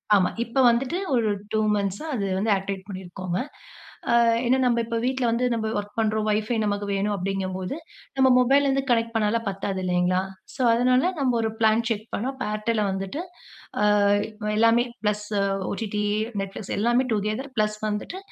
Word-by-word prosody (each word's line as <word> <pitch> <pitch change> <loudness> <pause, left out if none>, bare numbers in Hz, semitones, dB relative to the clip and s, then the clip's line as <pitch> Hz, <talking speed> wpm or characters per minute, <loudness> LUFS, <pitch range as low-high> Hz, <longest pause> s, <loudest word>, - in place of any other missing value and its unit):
ஆமா. 185 -3 +3
இப்ப 235 +3 0
வந்துட்டு 255 +8 0 0.2
ஒரு 230 -3 +2 0.2
2 220 - +1 0.2
மன்த்ஸ்சா 200 +7 -2
அது 205 -4 -1
வந்து 215 +2 +1
ஆக்டிவேட் 195 0 -4
பண்ணியிருக்கோங்க. 185 -1 -5 0.8
அ - - +6 0.3
ஏன்னா 255 +2 +3
நம்ப 240 -1 +2
இப்ப 230 0 -2
வீட்ல 260 -1 0
வந்து 245 +2 +1
நம்ப 220 -1 -1
ஒர்க் 205 +1 -9
பண்ணுறோம். 215 -1 +1
வைஃபை 215 +2 0
நமக்கு 205 0 -1
வேணும். 200 +1 0
அப்படீங்கம்போது, 190 +2 -3 0.4
நம்ம 265 0 +5
மொபைல்லேருந்து 275 +1 +3
கனெக்ட் 230 0 +1
பண்ணால்லாம் 225 +1 +1
பத்தாது 195 -1 -3
இல்லைங்களா? 180 0 +1 0.3
ஸோ, 270 - -4
அதனால 250 +2 +3 0.2
நம்ப 255 -3 +2
1 220 - 0
பிளான் 220 +1 +3
செக் 220 -1 -2
பண்ணோம். 260 +6 -2
அப்ப 265 - -4
Airtelல 215 0 0
வந்துட்டு, 195 +9 -4 0.6
அ - - +3 0.7
எல்லாமே 230 +2 +5 0.2
பிளஸ் 210 0 -1 0.4
OTT, 210 0 -3 0.4
Netflix 195 +1 -6
எல்லாமே 240 +4 +3
டூகெதர் 215 +6 -2
பிளஸ் 215 0 +1
வந்துட்டு 210 - -4
215 Hz, 155 wpm, -25 LUFS, 200-240 Hz, 0.8 s, அ